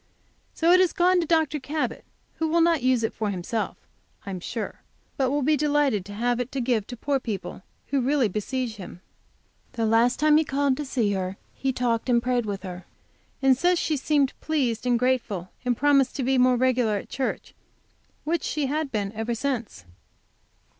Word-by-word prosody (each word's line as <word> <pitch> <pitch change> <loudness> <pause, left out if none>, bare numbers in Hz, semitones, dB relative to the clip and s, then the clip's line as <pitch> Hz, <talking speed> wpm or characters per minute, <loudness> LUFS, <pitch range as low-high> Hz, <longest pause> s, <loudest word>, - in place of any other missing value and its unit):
So 335 +1 +3
it 365 - +7
has 370 -2 +3
gone 365 0 +3
to 330 - -3
Dr. 315 -2 +2
Cabot, 295 +3 -3 0.3
who 320 - 0
will 335 +2 +2
not 330 -2 +3
use 255 -2 +2
it 225 - -1
for 215 -2 -2
himself, 200 +4 -3 0.5
I 195 - -5
am 185 - -4
sure, 220 +5 -5 0.3
but 265 -2 +1
will 290 +1 0
be 305 +3 +3
delighted 290 -8 +1
to 205 - -9
have 240 +2 0
it 245 0 -3
to 275 - -2
give 235 -4 0
to 245 - -7
poor 280 +3 0
people, 220 -6 -5 0.3
who 275 -2 +1
really 265 -1 +2
besiege 220 +3 -3
him. 180 -2 -10 0.7
The 230 -2 -1
last 230 +3 +3
time 305 0 +5
he 315 - +4
called 280 -2 +1
to 295 - -4
see 235 -6 0
her 190 0 -3 0.2
he 270 - -1
talked 245 -1 -1
and 240 -1 +4
prayed 245 -2 0
with 200 -1 -4
her, 180 -1 -7 0.6
and 265 -1 +6
says 355 +7 +2
she 315 - 0
seemed 280 -1 +1
pleased 255 -7 -1
and 245 -1 +3
grateful, 235 -7 -1
and 245 -2 0
promised 280 -2 +3
to 275 - -2
be 260 +1 +2
more 250 0 +5
regular 245 -3 +2
at - - -8
church, 270 - -3 0.7
which 335 +2 0
she 300 -2 -1
had 295 +1 -2
been, 205 -3 -2
ever 225 +2 -3
since. 235 - -3
255 Hz, 195 wpm, -25 LUFS, 225-290 Hz, 0.7 s, it